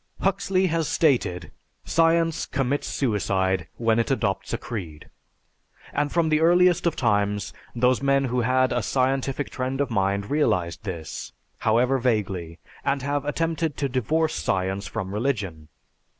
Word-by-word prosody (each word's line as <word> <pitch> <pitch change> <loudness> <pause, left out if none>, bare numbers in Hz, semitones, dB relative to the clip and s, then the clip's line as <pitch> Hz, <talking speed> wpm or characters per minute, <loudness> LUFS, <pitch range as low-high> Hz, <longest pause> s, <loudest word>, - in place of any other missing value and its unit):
Huxley 195 -1 +1
has 165 -3 0
stated, 105 - +1 0.3
"Science 165 0 +2
commits 135 +1 -1
suicide 95 - 0
when 115 -1 +2
it 115 - 0
adopts 105 -7 -1
a - - 0
creed," 85 -10 -7 0.8
and 145 - 0
from 170 -2 +2
the 155 0 +3
earliest 175 +1 +4
of 170 - 0
times 105 -3 0 0.2
those 125 +2 +2
men 140 0 +3
who 125 -1 0
had 130 +1 +2
a 120 - +1
scientific 135 +3 0
trend 130 +1 -3
of 140 -3 0
mind 100 0 0
realized 90 - 0
this, 85 -5 -6 0.3
however 125 +4 +2
vaguely, 95 -9 -1 0.3
and 140 -1 0
have 145 0 -1
attempted 165 0 -1
to 140 - 0
divorce 150 +6 0
science 95 +2 -1
from 95 -3 -4
religion. 105 - -2
125 Hz, 140 wpm, -25 LUFS, 100-145 Hz, 0.8 s, earliest